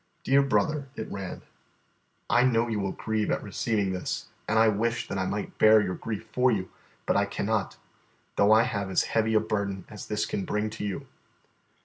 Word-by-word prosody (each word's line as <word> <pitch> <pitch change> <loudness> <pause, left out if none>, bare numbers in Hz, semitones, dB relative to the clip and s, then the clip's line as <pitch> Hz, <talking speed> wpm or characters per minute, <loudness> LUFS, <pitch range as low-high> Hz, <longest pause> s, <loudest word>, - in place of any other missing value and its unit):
"DEAR 135 +1 +4
BROTHER," 140 +1 0
it 110 - -6
ran, 95 -2 -6 0.8
"I 120 - +4
know 120 -2 +3
you 110 -3 -1
will 95 -1 -1
grieve 110 -1 -1
at - - 0
receiving 100 -1 -1
this, 90 - -4 0.2
and 110 - +1
I 110 0 +6
wish 115 +3 0
that 100 - -3
I 95 - 0
might 105 - -4
bear 110 0 +7
your 95 -3 -1
grief 110 +2 -5
for 125 0 +4
you, 95 -4 -2 0.3
but - - +1
I 100 - +3
cannot, 105 0 -2 0.6
though 100 +1 +4
I 110 +1 +7
have 100 -5 -2
as 95 - +2
heavy 110 0 +1
a - - +7
burden 100 -3 -2
as 105 -3 -9
this 105 -1 -1
can 100 - -3
bring 105 +2 -1
to 110 - -6
you. 100 -2 -3
110 Hz, 200 wpm, -27 LUFS, 100-115 Hz, 0.8 s, bear